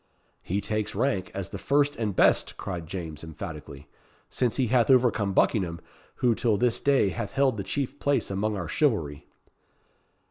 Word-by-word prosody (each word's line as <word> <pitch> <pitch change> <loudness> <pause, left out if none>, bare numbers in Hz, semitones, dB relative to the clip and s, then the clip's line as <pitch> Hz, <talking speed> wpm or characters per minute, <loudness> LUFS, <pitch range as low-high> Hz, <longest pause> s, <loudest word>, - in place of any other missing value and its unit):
"He 100 +3 -2
takes 110 +1 -2
rank 115 -9 0
as 95 -3 -4
the - - -7
first 145 +1 +2
and 105 -4 -2
best," - - +3
cried 85 -4 -5
James, 80 -4 -6
emphatically; 75 -2 -8 0.4
"since 120 -3 0
he 130 - +2
hath 120 +1 +2
overcome 120 -6 +3
Buckingham, 90 -5 +1 0.4
who 120 -2 +2
till 110 -2 +1
this 120 +2 +1
day 140 -8 +3
hath 100 +3 -5
held 135 -2 +2
the 100 - -4
chief 135 +7 -3
place 140 -7 0
among 105 +2 -1
our 90 -4 -4
chivalry." 85 - 0
105 Hz, 165 wpm, -27 LUFS, 90-125 Hz, 0.4 s, best